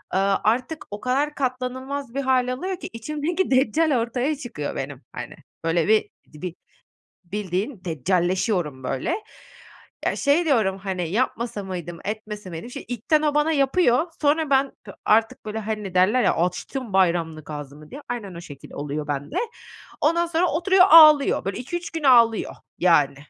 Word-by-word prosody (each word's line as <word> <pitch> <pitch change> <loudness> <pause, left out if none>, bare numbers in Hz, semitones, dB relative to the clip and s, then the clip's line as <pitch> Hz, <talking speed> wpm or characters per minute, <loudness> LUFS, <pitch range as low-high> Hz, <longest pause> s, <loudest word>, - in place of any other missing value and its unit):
ııı, 195 0 +2
artık 255 +8 0
o 205 - -6
kadar 280 +4 0
katlanılmaz 260 0 -3
bir 275 - 0
hâl 260 -1 +2
alıyor 370 +7 -4
ki, - - -7
içimdeki 305 +9 -2
deccal 265 +2 +3
ortaya 250 +6 -1
çıkıyor 235 - -5
benim, 135 0 -5
hani. - - -7 0.3
Böyle 165 +1 +1
bir, 220 0 +3 0.2
di 150 - -13
bi 180 -2 -5 0.7
bildiğin, 195 +3 -3
deccalleşiyorum, 175 - 0
böyle. 135 - -1 0.9
Ya, - - +1
şey 300 +4 +2
diyorum, 215 -10 +2
hani, 185 -4 -3
"Yapmasa 230 -1 -1
mıydım, 175 -3 -6
etmese 210 -2 -5
miydim?" 165 +8 -7
Şimdi - - -8
ilkten 250 +6 +1
o 295 -1 0
bana 300 +2 +3
yapıyor. 275 +1 +3
Sonra 300 +1 +2
ben 270 0 +3
p 200 - -10
artık, 220 0 +2
böyle, 215 +1 -4
hani, 210 -3 -4
derler 210 +7 +4
ya, - - +3
"Açtım 200 +6 -3
bayramlık 170 -5 +1
ağzımı." 145 +1 -9
diye. 285 +3 -8
Aynen 205 -7 -5
o 170 - -7
şekil 145 -5 -12
oluyor 145 +1 -4
bende. 145 0 -4 0.7
Ondan 335 +3 +3
sonra 335 +1 +1
oturuyor, 365 +4 +4
ağlıyor. 305 -7 +7
Böyle 195 - -2
2-3 345 +7 -5
gün 325 -2 -5
ağlıyor, 235 -5 +4 0.2
yani. 165 -6 +4
225 Hz, 155 wpm, -23 LUFS, 180-280 Hz, 0.9 s, ağlıyor